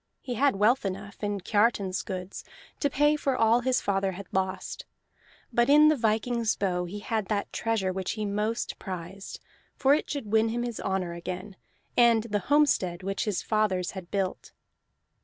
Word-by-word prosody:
He 250 - -5
had 270 +1 +2
wealth 220 +6 +3
enough, 200 +2 -6
in 205 -1 -1
Kiartan's 205 -2 +1
goods, 185 0 -6 0.4
to 285 - +1
pay 295 +3 +3
for 275 -3 0
all 225 +1 +4
his 255 0 +1
father 195 -1 0
had 195 +2 -8
lost; 190 0 -2 0.7
but 240 +3 +3
in 300 +2 +7
the 310 - +4
viking's 225 -1 +1
bow 180 -3 -1
he 205 +4 -7
had 215 -1 -2
that 205 -2 -2
treasure 220 -5 0
which 190 -1 -2
he 215 -1 -3
most 210 +3 -2
prized, 190 +1 -7 0.4
for 270 +1 +4
it 300 - 0
should 270 -8 -4
win 220 0 +3
him 240 +1 -2
his 240 -2 -4
honor 190 -3 -2
again, 185 +3 -6 0.4
and 235 -2 +5
the 210 -3 -1
homestead 195 -12 +3
which 195 +1 -2
his 210 -4 -1
fathers 205 -4 0
had 185 -3 -8
built. 195 -2 -3
210 Hz, 175 wpm, -28 LUFS, 190-235 Hz, 0.7 s, in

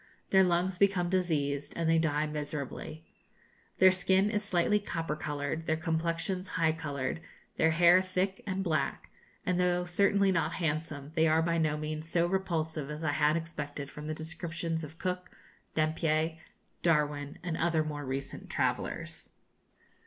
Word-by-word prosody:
Their 190 -1 +7
lungs 180 +1 +1
become 195 -3 +3
diseased, 145 -6 0
and 165 -1 -1
they 165 0 +4
die 155 -2 +1
miserably. 150 +1 -5 0.7
Their 185 0 +7
skin 190 +2 +3
is 210 -1 0
slightly 205 +1 +2
copper 165 -6 -3
coloured, 150 +1 -3
their 160 - +2
complexions 165 +3 -1
high 165 -1 +4
coloured, 145 -2 -3 0.4
their 160 - +4
hair 170 +3 +6
thick 185 +1 -1
and 190 0 -1
black; 155 -6 -1 0.3
and, 180 -1 +1
though 180 0 +2
certainly 200 +2 +3
not 165 -2 +1
handsome, 155 -3 -2
they 160 -1 +3
are 160 +1 +3
by 170 0 +1
no 155 -1 +1
means 155 +1 -4
so 170 0 +3
repulsive 160 -5 -1
as 150 +2 -5
I 155 - +1
had 150 +1 +3
expected 145 -4 -5
from 150 0 -8
the 155 - -2
descriptions 160 0 -4
of 155 +2 -9
Cook, 180 0 -3 0.5
Dampier, 160 +1 +1 0.4
Darwin, 150 -3 +1
and 175 -2 -2
other 165 -1 +2
more 150 -1 -4
recent 135 +1 -5
travellers. - - 0
[Illustration: - - -10
Fuegian - - -40
Weapons. - - -34
160 Hz, 160 wpm, -31 LUFS, 155-180 Hz, 0.7 s, Their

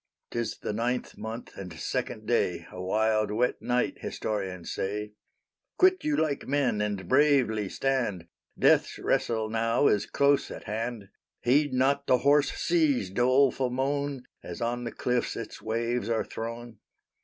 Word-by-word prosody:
'Tis 115 -2 -2
the - - -4
ninth 120 +3 -2
month 115 +2 -7
and 90 -3 -7
second 80 - -3
day, - - 0
A 90 - -7
wild, 110 +2 +1
wet 115 +4 0
night, 125 0 0
historians 95 -5 -4
say. 105 +2 -3 0.6
Quit 370 -2 +4
you 305 -1 +1
like 150 -3 -1
men, 135 -6 +1
and 100 -3 -2
bravely 130 -7 +3
stand; 120 -11 -1 0.3
Death's - - +3
wrestle 110 -2 0
now 115 +4 +1
is 105 -5 +3
close 140 0 +2
at - - -8
hand; 110 -1 -4 0.3
Heed 140 +4 +3
not 140 +2 +1
the 125 - +5
hoarse 145 +2 +3
sea's 150 - +1
doleful 130 +3 +3
moan, 140 +1 -1 0.2
As 85 - -7
on 120 +1 -2
the 115 - -3
cliffs 125 -1 -1
its - - -7
waves 115 +2 -1
are 115 -1 0
thrown. 115 0 -7
120 Hz, 145 wpm, -28 LUFS, 105-135 Hz, 0.6 s, the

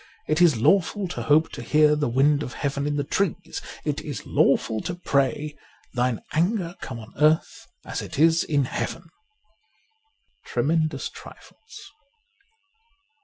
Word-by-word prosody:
It 155 +3 +1
is 165 -8 +5
lawful 195 - +2
to - - -5
hope 155 +2 +3
to - - -7
hear 150 0 +4
the 150 -3 0
wind 140 +4 +3
of 125 - -5
Heaven 140 0 -2
in 145 - -1
the 145 - 0
trees. 195 +5 -2 0.2
It - - -1
is - - -6
lawful 110 -1 +2
to 175 - -4
pray, 145 -2 0 0.2
' - - -34
Thine 125 -3 0
anger 175 +1 0
come 125 - -6
on 110 -1 -11
earth 155 +1 +2 0.2
as - - -4
it - - -7
is 165 +2 +4
in 145 -3 +1
Heaven.' 165 +6 -4 0.8
' 440 0 -32
Treme?idous 155 +1 0
Trifles.' 445 - -14
150 Hz, 150 wpm, -24 LUFS, 140-170 Hz, 0.8 s, is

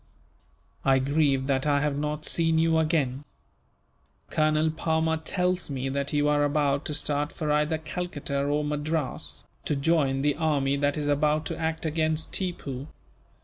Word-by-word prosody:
"I 135 -1 +4
grieve 140 0 +2
that 135 +1 0
I 145 -1 +3
have 145 -1 0
not 150 +1 -3
seen 165 -1 +2
you 160 0 +3
again. 150 -4 0 1.1
Colonel 155 0 +2
Palmer 160 0 0
tells 180 +2 -1
me 135 -1 -2
that 140 +1 -2
you 145 0 +2
are 145 0 +3
about 145 0 +1
to 150 - -2
start 145 0 -1
for 155 -2 -2
either 150 +2 +2
Calcutta 155 -3 -3
or 145 +1 0
Madras, 150 0 -3 0.2
to 150 - 0
join 140 -2 +1
the 145 0 +3
army 145 -4 +1
that 145 +1 0
is 150 -1 -2
about 150 +1 +2
to 165 - -3
act 160 0 -2
against 160 0 0
Tippoo. 145 -8 -3
150 Hz, 155 wpm, -27 LUFS, 140-160 Hz, 1.1 s, I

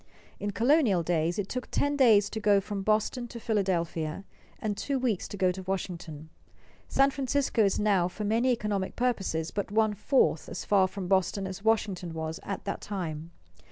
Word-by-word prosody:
In 205 - -2
colonial 230 - +3
days 165 0 0
it 205 -2 -2
took 255 +3 -4
ten 285 0 +1
days 220 -7 +5
to 220 - -3
go 205 -2 +4
from 200 0 -4
Boston 215 +4 0
to 235 - -8
Philadelphia, 180 -6 -1 0.3
and 210 -2 -2
two 275 +6 -2
weeks 245 -7 -1
to 205 - -7
go 185 -1 +3
to 190 +1 -7
Washington. 170 -5 -5 0.6
San 275 0 +3
Francisco 265 -3 +1
is 195 -2 +2
now 200 -4 +3
for 195 +4 -6
many 225 +5 +2
economic 210 -5 -2
purposes 195 -10 -1
but 200 - -3
one 215 +1 +2
fourth 210 - +1
as - - -6
far 195 -2 +4
from 190 -1 -6
Boston 190 +1 +1
as 190 +1 -6
Washington 195 -6 0
was 160 0 -4
at 200 - -5
that 200 - -3
time. 165 -5 -5
200 Hz, 180 wpm, -28 LUFS, 180-225 Hz, 0.6 s, days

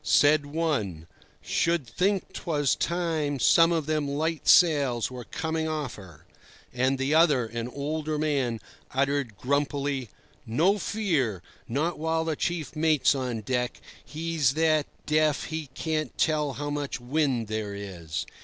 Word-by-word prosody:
Said 145 0 +4
one: 140 - -1 0.4
"Should 165 -4 +1
think 190 - -1
'twas 145 -5 0
time 165 -4 -1
some 165 +6 +5
of 165 -3 0
them 155 -1 0
light 155 +3 -2
sails 140 -9 +4
were 125 -2 -7
coming 160 0 -2
off 155 -4 -3
her." 90 -7 -13 0.5
And 130 +2 +1
the 135 +3 0
other, 155 -7 +4
an 115 +1 -4
older 150 +3 -3
man, 140 -7 0 0.3
uttered 135 -4 0
grumpily: 140 -2 -1 0.3
"No 170 - +2
fear! 145 - -1 0.2
not 150 +7 -1
while 160 +1 0
the 160 -1 -1
chief 170 -1 -3
mate's 155 -4 +3
on 125 -5 -3
deck. 125 +2 -2 0.2
He's 155 -4 0
that 155 -2 +2 0.2
deaf 155 -1 +2
he 160 -2 -4
can't 155 -1 -2
tell 150 -3 +1
how 145 +1 -4
much 145 -2 -3
wind 130 -2 0
there 105 -2 -3
is." 85 -6 -5
145 Hz, 140 wpm, -27 LUFS, 125-160 Hz, 0.5 s, some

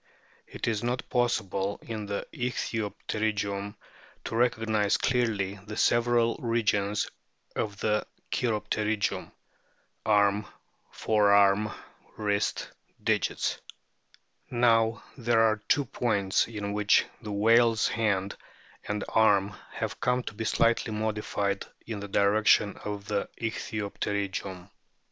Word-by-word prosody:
It - - -5
is 110 -3 0
not 120 +2 -2
possible 100 -5 0
in 110 -3 -5
the 100 0 -3
ichthyopterygium 105 -3 -2 0.5
to - - -4
recog 115 -1 +2
nise 105 -2 +2
clearly 105 -6 0
the 105 0 -6
several 120 0 +3
regions 105 -4 +1 0.5
of 105 -2 -2
the 105 -1 +1 0.2
cheiropterygium 105 -2 -1 0.7
arm, 105 -1 +3 0.4
forearm, 100 -1 +3 0.5
wrist, 105 -1 -1 0.3
digits. - - 0 0.9
Now 115 -2 +3 0.2
there 120 -1 +3
are 110 -1 +3
two 145 0 +3
points 100 -7 +1
in 105 -3 -4
which 105 0 +4 0.2
the 105 - -6
whale's 115 +2 +4
hand 100 -3 0 0.5
and 105 0 -2
arm 100 -3 +3 0.2
have - - -4
come 125 0 +1
to - - -6
be 110 +2 -4
slightly 115 0 +2
modified 105 -2 -2 0.2
in 110 -2 -5
the 100 - -6
direction 100 +1 +3
of 105 -1 -4
the 105 -1 -2
Ichthyopterygium. 100 -4 -3
105 Hz, 105 wpm, -28 LUFS, 100-115 Hz, 0.9 s, which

